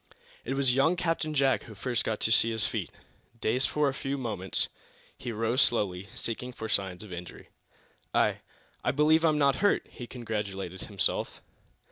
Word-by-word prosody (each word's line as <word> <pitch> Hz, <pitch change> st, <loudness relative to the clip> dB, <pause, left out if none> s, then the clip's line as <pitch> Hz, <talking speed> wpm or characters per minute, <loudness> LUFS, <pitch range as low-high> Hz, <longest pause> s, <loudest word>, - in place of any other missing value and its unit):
It 135 Hz, -, -2 dB
was 135 Hz, -2 st, +3 dB
young 140 Hz, +7 st, +4 dB
Captain 165 Hz, -3 st, -1 dB
Jack 135 Hz, -6 st, +3 dB
who 110 Hz, -, -11 dB
first 120 Hz, +3 st, -1 dB
got 110 Hz, -, -1 dB
to 110 Hz, -, +1 dB
his 110 Hz, -1 st, +4 dB
feet. -, -, -2 dB, 0.5 s
Dazed 125 Hz, +5 st, +1 dB
for 150 Hz, -1 st, +2 dB
a 135 Hz, -, 0 dB
few 135 Hz, 0 st, -3 dB
moments, 105 Hz, -7 st, 0 dB, 0.5 s
he 120 Hz, -, -5 dB
rose 115 Hz, +4 st, +1 dB
slowly 100 Hz, -7 st, +1 dB
seeking 125 Hz, +1 st, -4 dB
for 110 Hz, -, -5 dB
signs 95 Hz, -3 st, -1 dB
of 100 Hz, -4 st, -9 dB
injury. 90 Hz, 0 st, -9 dB, 0.6 s
"I -, -, +2 dB, 0.4 s
I -, -, +1 dB
believe 155 Hz, +3 st, +4 dB
I'm 155 Hz, -2 st, +4 dB
not 140 Hz, -3 st, +3 dB
hurt," 205 Hz, -, +2 dB
he 120 Hz, -, -8 dB
congratulated 100 Hz, -6 st, -4 dB
himself. 100 Hz, -3 st, -1 dB
120 Hz, 165 wpm, -29 LUFS, 105-140 Hz, 0.6 s, young